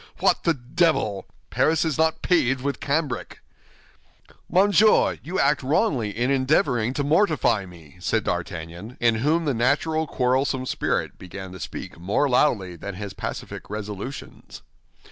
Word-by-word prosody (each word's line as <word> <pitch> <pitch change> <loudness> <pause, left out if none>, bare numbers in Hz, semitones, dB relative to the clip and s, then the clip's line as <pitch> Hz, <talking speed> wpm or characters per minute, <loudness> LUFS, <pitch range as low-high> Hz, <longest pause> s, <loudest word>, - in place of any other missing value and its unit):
What - - +2
the 170 -2 +3
devil! 125 - 0 0.2
Paris 160 +1 +2
is 160 -3 0
not 160 0 +1
paved 135 -7 +2
with 140 0 -2
cambric!" 140 -3 -2 1.1
"Monsieur, 205 +3 +4
you 180 +4 -3
act 145 +1 +3
wrongly 135 - +1
in 120 +6 -1
endeavoring 130 -4 +2
to 145 - 0
mortify 155 - +2
me," 85 -3 -15
said 110 +4 0
D'Artagnan, 85 +5 -5
in 120 -1 +3
whom 160 +5 +2
the 145 - +1
natural 150 +6 +1
quarrelsome 130 0 0
spirit - - -2
began 95 +1 -8
to 95 - -10
speak 85 - -7
more 100 +11 +1
loudly 115 -9 +2
than 100 +3 -7
his 100 0 -6
pacific - - -6
resolutions. 105 +5 -7
130 Hz, 140 wpm, -24 LUFS, 100-155 Hz, 1.1 s, Monsieur